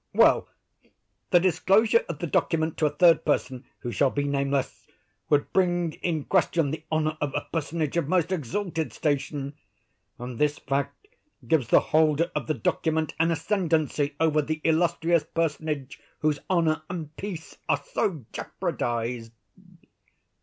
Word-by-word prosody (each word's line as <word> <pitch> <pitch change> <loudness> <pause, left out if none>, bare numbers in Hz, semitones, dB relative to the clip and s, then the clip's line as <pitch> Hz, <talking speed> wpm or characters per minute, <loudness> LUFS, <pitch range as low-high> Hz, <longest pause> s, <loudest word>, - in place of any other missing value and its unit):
Well; - - +5 0.8
the 175 - +6
disclosure 205 +5 +3
of 165 - -3
the 170 - -3
document 160 0 0
to 155 - +3
a - - +1
third 165 +2 +4
person, 130 -1 -1 0.2
who 120 - -4
shall 135 +5 +2
be 145 +2 -1
nameless, 140 -1 -1 0.4
would 145 -1 +2
bring 175 -3 +2
in 160 -4 -1
question 165 -5 +1
the 155 0 -5
honor 155 0 0
of 145 -2 -2
a 145 - -2
personage 160 -1 -2
of 170 - 0
most 180 0 +1
exalted 160 - -2
station; 145 -1 -2 0.6
and 120 -1 -7
this 150 0 +2
fact 140 - -3 0.4
gives 160 -7 +2
the - - +6
holder 155 +2 +3
of - - -3
the 155 - 0
document 160 -3 0
an 165 +1 +3
ascendancy 160 -5 0
over 155 -2 +3
the 155 +2 -3
illustrious 165 0 +2
personage 150 -4 -3 0.2
whose 150 -2 +1
honor 165 -4 +2
and 160 -4 -6
peace 185 -5 -7
are - - +1
so 160 - -1
jeopardized." 115 -1 -3
155 Hz, 145 wpm, -26 LUFS, 145-170 Hz, 0.8 s, the